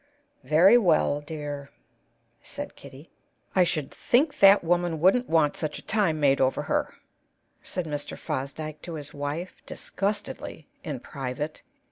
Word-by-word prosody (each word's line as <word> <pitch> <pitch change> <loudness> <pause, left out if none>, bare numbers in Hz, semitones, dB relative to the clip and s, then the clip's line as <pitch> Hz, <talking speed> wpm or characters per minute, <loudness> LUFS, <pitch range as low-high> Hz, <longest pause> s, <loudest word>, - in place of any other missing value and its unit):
"Very 180 +10 +6
well, 155 -7 +2
dear," 145 -2 -6 0.7
said - - -7
Kitty. 140 +3 -13 0.4
"I 185 - +6
should 155 -5 -1
think 285 +5 +1
that 195 -1 +7
woman 175 -1 +1
wouldn't 195 +9 +3
want 160 -3 +3
such 155 -2 -3
a - - -10
time 195 -8 +1
made 140 -2 +3
over 130 0 +2
her," - - -1 0.7
said 180 -2 -4
Mr. 145 -2 -5
Fosdyke 150 +1 -5
to 170 -2 -7
his 145 -1 -8
wife, 145 +5 -4
disgustedly, 200 -6 -4 0.2
in 145 -6 -5
private. 135 +3 -5
155 Hz, 135 wpm, -26 LUFS, 145-180 Hz, 0.7 s, that